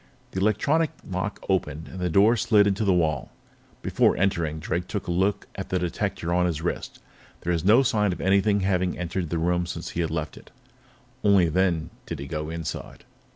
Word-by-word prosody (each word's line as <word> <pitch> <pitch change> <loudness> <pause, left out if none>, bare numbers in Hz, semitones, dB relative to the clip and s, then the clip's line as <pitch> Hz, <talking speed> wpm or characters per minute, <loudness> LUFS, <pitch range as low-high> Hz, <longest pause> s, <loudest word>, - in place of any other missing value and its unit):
The 95 - -3
electronic 140 +11 +2 0.2
lock 95 +2 -4
opened, 80 -5 -1
and 95 - -8
the 90 0 0
door 100 +7 +5
slid 105 -2 +4
into 100 +1 +1
the 100 - +3
wall. 80 -6 +1 0.5
Before - - +2
entering, 85 -5 0
Drake 85 +2 -3
took 100 - -4
a - - -2
look 95 +4 +1
at 95 - -6
the 95 - +1
detector 90 -1 -2
on 90 0 +3
his 80 -3 -2
wrist. 85 - -3 0.4
There 90 - 0
was 80 -2 -1
no 110 +8 +6
sign 105 -5 +2
of 90 - -5
anything 100 +1 +3
having 95 -1 0
entered 90 -1 -3
the 85 - -1
room 85 +1 +1
since 85 -1 -5
he 85 - -2
had 80 - -1
left 80 -1 -4
it. - - -14 0.7
Only 100 -5 +5
then 85 -1 +1 0.2
did - - -4
he 70 - -6
go 75 +1 -4
inside. 80 -1 -6
90 Hz, 200 wpm, -25 LUFS, 85-100 Hz, 0.7 s, no